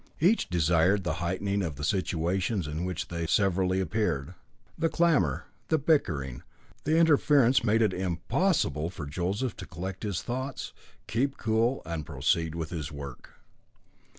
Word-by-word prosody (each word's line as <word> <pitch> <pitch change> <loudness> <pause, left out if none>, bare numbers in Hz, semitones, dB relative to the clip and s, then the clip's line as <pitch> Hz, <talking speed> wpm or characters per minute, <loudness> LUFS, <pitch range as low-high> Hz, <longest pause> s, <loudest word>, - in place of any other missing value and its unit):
Each 185 - +3
desired 90 +3 +3
the 85 -2 -1
heightening 100 +3 -1
of 80 -6 -3
the 75 - -7
situations 90 +3 0
in 75 +4 -3
which 90 -2 -4
they 85 -1 -3
severally 95 0 +2
appeared. 95 -7 -1 0.4
The 165 0 +1
clamour, 155 - +2 0.2
the 160 - +3
bickering, 80 - 0 0.4
the 155 +2 +3
interference 145 -6 +5
made 115 0 +3
it 105 -4 +2
impossible 90 - 0
for 80 -5 -7
Joseph 95 - -2
to - - -8
collect 95 +2 -6
his 100 -5 -2
thoughts, 130 +2 -4 0.3
keep 135 +4 0
cool, 115 +4 +1
and 80 -1 -3
proceed 80 +3 0
with 80 -2 -4
his 75 -5 -4
work. 70 -3 -9
95 Hz, 145 wpm, -28 LUFS, 80-115 Hz, 0.4 s, interference